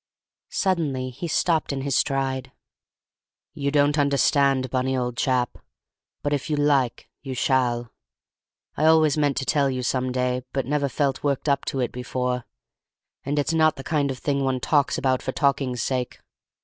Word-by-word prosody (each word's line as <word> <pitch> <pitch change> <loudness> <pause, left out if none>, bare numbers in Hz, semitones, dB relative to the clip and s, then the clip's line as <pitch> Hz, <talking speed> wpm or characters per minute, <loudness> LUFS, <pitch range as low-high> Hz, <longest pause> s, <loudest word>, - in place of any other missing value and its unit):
Suddenly 145 -9 -1
he 170 +8 -6
stopped 160 -1 +1
in 135 -1 -3
his 140 -1 -1
stride. 135 -1 0 1.0
"You 140 0 -2
don't 145 +1 +2
understand, 140 -2 +2
Bunny, 130 0 0
old 125 -1 -2
chap; 125 -1 0 0.6
but 145 - 0
if 145 +1 -2
you 150 - +1
like 140 -4 +1
you 135 -2 -5
shall. 120 -2 +1 0.8
I 155 - +1
always 160 -2 +5
meant 145 -3 +1
to 135 - -1
tell 140 -1 +2
you 130 -1 -3
some 130 0 0
day, 125 0 0
but 135 -2 -1
never 145 +1 0
felt 140 0 -1
worked 140 0 -1
up 140 -1 +1
to 135 - -2
it 125 - -1
before, 125 0 -3 0.8
and 145 +2 -2
it's 145 +2 +1
not 155 -1 +3
the 135 - -8
kind 145 -2 0
of 130 - -3
thing 140 +1 -1
one 130 -1 0
talks 145 +2 +1
about 130 -1 +1
for 130 - -4
talking's 135 -4 0
sake. 125 -2 -2
135 Hz, 170 wpm, -24 LUFS, 130-145 Hz, 1.0 s, always